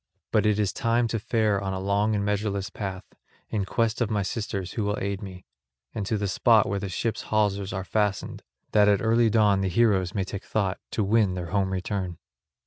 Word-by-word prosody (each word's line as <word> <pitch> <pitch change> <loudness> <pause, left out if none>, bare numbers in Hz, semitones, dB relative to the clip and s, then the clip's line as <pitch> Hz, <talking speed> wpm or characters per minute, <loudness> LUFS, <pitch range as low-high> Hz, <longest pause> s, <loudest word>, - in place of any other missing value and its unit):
But - - +3
it 105 -1 +2
is 105 -2 0
time 120 -2 +1
to 115 - -1
fare 105 -2 +1
on 95 -1 -2
a 95 - -3
long 100 +3 +1
and 100 -1 -1
measureless 100 -1 -1
path, 95 -3 -5 0.5
in 100 -3 0
quest 115 +3 0
of 115 - +1
my 105 -2 0
sisters 95 -2 -3
who 110 - -2
will 105 +1 -1
aid 100 0 -3
me, 95 -2 -9 0.5
and 105 -4 -3
to 110 - 0
the 100 0 -1
spot 110 +3 +4
where 100 0 -1
the 100 -1 -4
ship's 110 +5 -2
hawsers 100 -2 +1
are 95 -1 -3
fastened, 105 0 -1 0.3
that 105 -1 +5
at 100 0 +2
early 115 +1 +4
dawn 105 -2 +3
the 95 - 0
heroes 95 -2 +2
may 100 - +1
take 100 +2 -6
thought 100 -3 -1
to 110 - -1
win 100 -2 +2
their 85 -2 -5
home 95 -2 +1
return." 95 -2 -3
100 Hz, 215 wpm, -26 LUFS, 95-110 Hz, 0.5 s, that